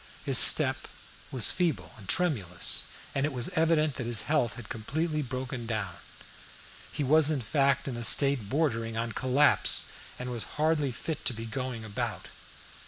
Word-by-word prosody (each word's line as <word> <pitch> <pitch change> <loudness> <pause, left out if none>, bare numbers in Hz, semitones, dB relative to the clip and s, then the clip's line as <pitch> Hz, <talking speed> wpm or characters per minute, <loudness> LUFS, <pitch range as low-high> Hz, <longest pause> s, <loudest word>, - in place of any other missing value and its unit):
His - - +7
step - - +6 0.4
was 125 -5 +2
feeble 175 -9 -2
and 105 -5 -16
tremulous, 105 - 0 0.3
and 135 - -1
it 155 - -1
was 125 +1 -3
evident 160 -4 0
that 120 - -5
his 115 -2 0
health 145 -6 -1
had 120 -3 -11
completely 155 +8 -4
broken 130 -2 -6
down. 105 -6 -3 1.0
He 150 - -4
was 150 +2 +3
in 155 -3 -1
fact 140 +4 0
in 130 - -4
a 120 - -6
state 135 -2 +3
bordering 115 -6 -2
on 115 0 -3
collapse, 130 +5 +2 0.3
and 125 0 -6
was 120 -2 -5
hardly 150 -3 0
fit 155 +6 -6
to 120 - 0
be 115 +1 -7
going 120 0 -6
about. 105 -2 -5
130 Hz, 165 wpm, -27 LUFS, 115-150 Hz, 1.0 s, His